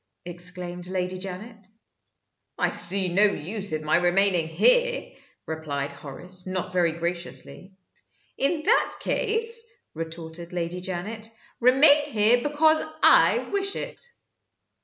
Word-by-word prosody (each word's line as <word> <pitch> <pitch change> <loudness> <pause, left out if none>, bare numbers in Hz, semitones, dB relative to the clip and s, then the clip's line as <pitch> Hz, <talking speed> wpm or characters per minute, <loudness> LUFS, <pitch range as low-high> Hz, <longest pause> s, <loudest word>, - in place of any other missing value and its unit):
exclaimed 175 0 -5
Lady 185 0 -3
Janet. 200 +3 -9 0.9
"I - - 0
see 185 -1 +1
no 200 +3 +5
use 200 +2 -2
in 155 0 -4
my 155 - +3
remaining 175 -1 +2
here," - - +2 0.3
replied 145 -3 -4
Horace, 180 +6 -6
not 185 -1 -4
very 175 -3 +1
graciously. 175 +2 -5 0.6
"In 305 +3 0
that 450 +8 +2
case," 460 +1 +2
retorted 165 +1 -8
Lady 175 +1 -4
Janet, 200 +5 -5 0.3
"remain 285 +4 +5
here 235 -3 +3
because 310 +2 +2 0.2
I - - +5
wish 395 -1 -2
it." - - -4
185 Hz, 115 wpm, -25 LUFS, 175-265 Hz, 0.9 s, no